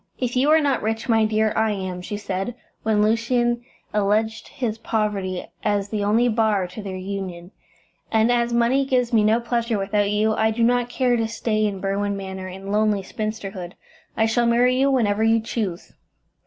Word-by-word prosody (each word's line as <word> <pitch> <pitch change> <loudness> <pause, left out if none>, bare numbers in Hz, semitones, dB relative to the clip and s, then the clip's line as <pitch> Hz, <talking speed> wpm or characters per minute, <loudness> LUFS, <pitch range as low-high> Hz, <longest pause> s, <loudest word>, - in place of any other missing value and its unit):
"If 250 -1 -2
you 265 +4 +3
are 315 +1 +6
not 280 -2 +1
rich, 225 +2 -2
my 225 -2 +3
dear, 215 0 +1
I 220 -1 +2
am," 185 -2 -4
she 205 +3 -5
said, 200 +3 -3 0.3
when 215 -1 +2
Lucian 240 +2 +1 0.3
alleged 210 +2 0
his 230 -5 -4
poverty 205 -5 -2 0.2
as 205 -1 0
the 210 -1 -2
only 220 +4 +3
bar 220 -4 +2
to 185 +4 -8
their 195 -2 -6
union, 185 -2 -6 0.6
"and 220 +1 +3
as 240 0 +1
money 235 +3 +3
gives 250 -3 0
me 220 -2 +5
no 220 +2 +3
pleasure 235 -1 -1
without 200 +1 0
you, 215 +1 +2
I 220 +1 +2
do 225 +1 0
not 245 +1 +2
care 245 -1 +1
to 225 -1 0
stay 220 -1 0
in 195 -2 -4
Berwin 200 +1 -1
Manor 190 -1 -6
in 190 +2 -7
lonely 210 -1 +2
spinsterhood. 195 -3 -5 0.4
I 220 - +3
shall 235 +1 +2
marry 245 +2 +3
you 270 +2 +3
whenever 220 -5 +2
you 225 0 +4
choose." 215 -6 -4
220 Hz, 185 wpm, -23 LUFS, 200-235 Hz, 0.6 s, are